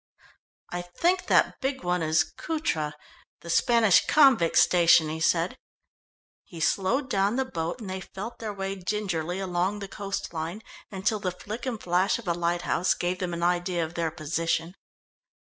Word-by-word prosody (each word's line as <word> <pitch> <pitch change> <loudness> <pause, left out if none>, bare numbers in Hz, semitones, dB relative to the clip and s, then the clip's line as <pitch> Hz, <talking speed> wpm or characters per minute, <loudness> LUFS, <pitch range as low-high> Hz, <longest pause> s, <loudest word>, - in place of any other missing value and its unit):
"I 175 - -3
think 345 - 0
that - - +3
big 265 -3 -2
one 180 0 0
is 160 0 +3
Cutra, 160 - -3 0.5
the 170 - -5
Spanish 230 0 +4
convict 265 - +5
station," 170 -3 +5
he 160 +1 -4
said. 165 +2 +1 0.8
He 170 - -11
slowed 215 - +1
down 200 -3 +1
the 265 0 0
boat, 170 -4 -4
and 210 - -7
they 190 0 -4
felt 210 +6 -8
their 220 -2 -4
way 195 -1 -4
gingerly 185 -3 -2
along 185 +1 -1
the 200 -1 -6
coast 200 -2 -5
line, 165 +6 -4 0.3
until 205 +2 -1
the 195 -3 -1
flick 215 +7 -7
and 235 -4 -3
flash 180 +2 +1
of 235 -4 -11
a 170 - +2
lighthouse 175 +1 0
gave 180 +1 -2
them 180 -2 -2
an 170 - -4
idea 175 -1 +1
of 160 - -9
their 170 -1 -1
position. 165 +2 -2
180 Hz, 165 wpm, -27 LUFS, 170-210 Hz, 0.8 s, convict